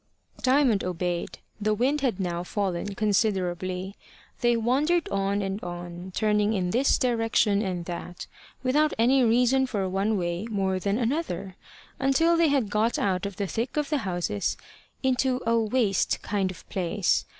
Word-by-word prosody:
Diamond 255 -6 +3
obeyed. 175 -1 -3 0.2
The 215 +1 +1
wind 270 +6 +1
had 245 -8 0
now 175 -2 -2
fallen 195 0 -2
considerably. 190 -3 0 0.4
They 240 -2 +3
wandered 285 +9 +1
on 200 +1 0
and 195 +2 -4
on, 175 +1 -7
turning 210 0 +2
in 180 -3 -1
this 260 +6 +3
direction 225 -5 +2
and 180 -4 -3
that, 175 0 -6 0.4
without 295 +4 +2
any 255 +4 +4
reason 250 +3 +3
for 205 -6 -1
one 195 +3 0
way 175 +3 -2
more 190 -3 0
than 200 +2 0
another, 235 - -2 0.4
until 280 +5 +3
they 335 -1 +4
had 270 -8 +1
got 220 +3 +1
out 190 -1 0
of 200 - -8
the 200 - -2
thick 230 +9 -3
of 300 +1 -1
the 300 - +2
houses 175 - -2 0.5
into 260 0 +1
a 230 0 +2
waste 220 -4 +1
kind 200 -2 0
of 185 - -10
place. 185 +1 0
210 Hz, 155 wpm, -26 LUFS, 185-250 Hz, 0.5 s, any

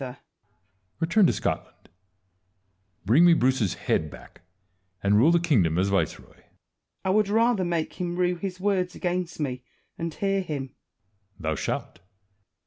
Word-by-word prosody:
Edward. 130 0 -6 0.8
Return 175 +4 +4
to - - +2
Scotland; - - -4 1.2
bring 125 - +5
me 175 -1 +7
Bruce's 130 - +1
head 80 - -1
back; - - -14 0.6
and 100 +1 +3
rule 120 +10 +5
the 170 - +4
kingdom 105 - +2
as 95 +2 +2
viceroy. 100 -1 -1
Wallace. - - -24 0.6
I - - +1
would 210 0 +2
rather 225 -1 +2
make 170 -2 -2
him 175 -1 -2
rue 180 0 +1
his 185 +1 -5
words 185 -2 0
against 180 -1 -3
me, 125 -4 -3 0.4
and 165 0 -3
hear 195 +3 -1
him. 140 -6 -5 0.6
Edward. 95 - -17
Thou 80 0 0
shalt. - - -4
170 Hz, 150 wpm, -26 LUFS, 125-185 Hz, 1.2 s, me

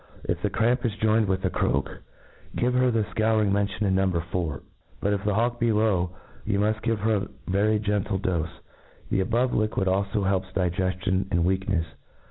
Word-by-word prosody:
If - - -2
the - - 0
cramp 120 +3 +1
is 115 -4 -1
joined 110 0 +2
with 95 0 0
the - - +1
croak, - - -1 0.5
give 125 +1 +1
her 125 0 +3
the 115 -2 +1
fcouring 110 -1 +1
mentioned 100 +1 0
in 95 - +2
No. 95 0 +2 0.2
4. 80 -6 -2 0.4
But, 100 - +1
if 100 -1 -2
the 105 -1 +1
hawk 120 +2 +1
be 115 -1 +2
low, 105 -5 +2 0.3
you 100 -1 0
muft 105 +1 +1
give 115 -2 0
her 110 0 +2
a 100 0 -3 0.2
very 105 +3 +2
gentle 105 -1 -1
dofe* 85 -4 -1 0.6
The - - +2
above 120 +7 +1
liquid 110 -3 0
alfo 100 +2 +1
helps 95 -1 +1
digeftion 95 +1 0
and 85 -2 +1
wcak 95 +1 +1
nefs. 85 -5 +1
100 Hz, 190 wpm, -26 LUFS, 95-110 Hz, 0.6 s, her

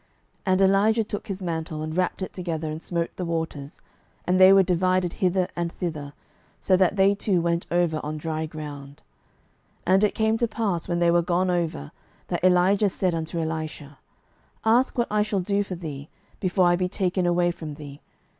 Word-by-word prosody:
12:002:008 - - -39 0.5
And 185 - +2
Elijah 205 +4 +3
took 210 +1 -6
his 195 -2 -5
mantle, 160 -2 -3
and 155 0 -5
wrapped 185 +1 -1
it - - -6
together, 165 -4 -3
and 155 +1 -6
smote 170 -1 -2
the 185 - -3
waters, 160 -4 -4 0.5
and 185 +1 +2
they 190 0 +9
were 195 0 +7
divided 185 0 +1
hither 185 -2 +1
and 170 -1 -2
thither, 150 -6 -5 0.5
so 185 - +3
that 185 +1 +3
they 195 0 +4
two 200 -2 0
went 170 0 -1
over 170 -3 +1
on 155 +1 -4
dry 160 0 -3
ground. 145 -2 -9 0.8
12:002:009 185 - +3
And 195 +2 +4
it 210 - +2
came 220 0 +2
to 235 - +2
pass, 205 -7 -2
when 175 -1 -1
they 170 0 +3
were 170 0 +4
gone 180 +2 +1
over, 165 - -2 0.4
that - - -2
Elijah 185 +3 +4
said 185 -1 -1
unto 165 +1 -3
Elisha, 155 -3 -5 0.7
Ask 240 +4 +3
what 240 -3 0
I 210 0 +2
shall 210 -1 0
do 200 +2 0
for 190 -2 -6
thee, 150 -4 -7 0.3
before 185 -1 +2
I 175 0 +4
be 180 0 -1
taken 185 -1 0
away 175 0 +2
from 155 -3 -8
thee. 145 -1 -10
175 Hz, 195 wpm, -25 LUFS, 160-190 Hz, 0.8 s, they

